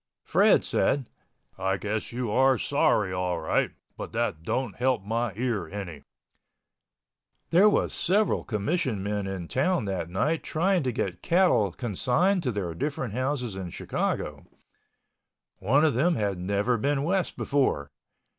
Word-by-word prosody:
Fred -, -, +4 dB
said, 140 Hz, -2 st, +1 dB, 0.5 s
"I 95 Hz, 0 st, 0 dB
guess 105 Hz, +2 st, -3 dB
you 120 Hz, -2 st, -3 dB
are 130 Hz, +3 st, +4 dB
sorry 115 Hz, -9 st, +1 dB
all 90 Hz, -2 st, -1 dB
right—but 80 Hz, -, -3 dB
that 115 Hz, -8 st, -1 dB
don't 110 Hz, +4 st, -2 dB
help 125 Hz, -4 st, +1 dB
my 115 Hz, +2 st, -1 dB
ear 120 Hz, -2 st, -2 dB
any." 95 Hz, -7 st, -6 dB, 1.5 s
There 190 Hz, +5 st, +6 dB
was -, -, +1 dB
several 200 Hz, +4 st, +2 dB
commission 115 Hz, -, -1 dB
men 100 Hz, -1 st, -2 dB
in 95 Hz, -3 st, -5 dB
town 155 Hz, -, +1 dB
that 95 Hz, -4 st, -3 dB
night, 150 Hz, -, 0 dB
trying 180 Hz, +3 st, +1 dB
to 130 Hz, -3 st, -1 dB
get 95 Hz, -7 st, -3 dB
cattle 165 Hz, -, +3 dB
consigned 130 Hz, -, +1 dB
to 130 Hz, -6 st, -1 dB
their 95 Hz, -6 st, -3 dB
different 135 Hz, -, -3 dB
houses 130 Hz, -3 st, -2 dB
in 95 Hz, -2 st, -5 dB
Chicago. -, -, -3 dB, 1.1 s
One 135 Hz, +11 st, +3 dB
of 155 Hz, -, +3 dB
them 165 Hz, +8 st, +2 dB
had 100 Hz, -6 st, -1 dB
never 100 Hz, +6 st, 0 dB
been 140 Hz, +3 st, 0 dB
West 185 Hz, +2 st, 0 dB
before. 100 Hz, -, 0 dB
120 Hz, 140 wpm, -27 LUFS, 95-145 Hz, 1.5 s, There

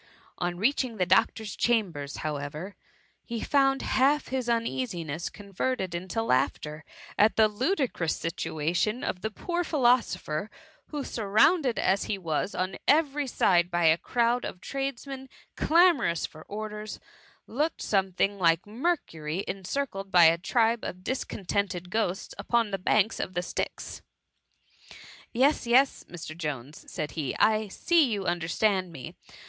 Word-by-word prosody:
On 175 Hz, -1 st, -2 dB
reaching 240 Hz, +2 st, 0 dB
the 180 Hz, -, +2 dB
doctor's 210 Hz, +4 st, +2 dB
cham 225 Hz, -6 st, +2 dB
ber, 145 Hz, -2 st, -6 dB
however, 150 Hz, +5 st, -5 dB, 0.5 s
he 230 Hz, -2 st, -5 dB
found 270 Hz, -1 st, +2 dB
half 280 Hz, +3 st, +2 dB
his 255 Hz, -2 st, -2 dB
uneasiness 210 Hz, -, -2 dB
con 200 Hz, -1 st, -14 dB
verted 190 Hz, -4 st, -1 dB
into 185 Hz, +6 st, -2 dB
laughter 150 Hz, -, 0 dB, 0.4 s
at 215 Hz, +2 st, +5 dB
the 220 Hz, -1 st, +6 dB
ludicrous 245 Hz, -, 0 dB
situation 170 Hz, +7 st, -1 dB
of 180 Hz, -, -3 dB
the 220 Hz, -, -2 dB
poor 345 Hz, -, -2 dB
philosopher, 240 Hz, -, +1 dB, 0.4 s
who, 295 Hz, -2 st, -4 dB
surrounded 235 Hz, -, +2 dB
as 195 Hz, +1 st, +1 dB
he 205 Hz, -, -2 dB
was 170 Hz, +1 st, -2 dB
on 185 Hz, +1 st, -2 dB
every 295 Hz, -2 st, +3 dB
»de 180 Hz, -7 st, +4 dB
by 175 Hz, -1 st, 0 dB
a 160 Hz, 0 st, +6 dB
crowd 240 Hz, 0 st, +1 dB
of -, -, -6 dB
tradesmen 270 Hz, +1 st, -5 dB, 0.3 s
clamorous 315 Hz, -, +3 dB
for 155 Hz, -, -11 dB
orders, 210 Hz, 0 st, -6 dB, 0.5 s
looked 300 Hz, +8 st, -1 dB
something 195 Hz, 0 st, +1 dB
like 165 Hz, -1 st, +3 dB
Mercury 205 Hz, -, -2 dB
encircled 195 Hz, +1 st, -4 dB
by 175 Hz, -2 st, +7 dB
a 165 Hz, +1 st, +5 dB
tribe 230 Hz, +4 st, +2 dB
of 180 Hz, 0 st, -6 dB
discontented 195 Hz, -6 st, -2 dB
ghosts 215 Hz, -3 st, -1 dB
upon 235 Hz, -3 st, +1 dB
the 195 Hz, -, -2 dB
banks 215 Hz, +3 st, +2 dB
of 185 Hz, -, -4 dB
the 175 Hz, -, 0 dB
Styx. -, -, -4 dB, 1.3 s
Yes, 265 Hz, +1 st, +2 dB
yes, 260 Hz, +3 st, +4 dB
Mr. 160 Hz, -2 st, -8 dB
Jones,'* 150 Hz, -4 st, -6 dB
said 150 Hz, -, -3 dB
he; 150 Hz, -5 st, -3 dB
"I 215 Hz, 0 st, +3 dB
see 335 Hz, -, +3 dB
you 200 Hz, -3 st, -2 dB
understand 180 Hz, +2 st, 0 dB
me. 135 Hz, -6 st, -8 dB
205 Hz, 140 wpm, -28 LUFS, 175-250 Hz, 1.3 s, by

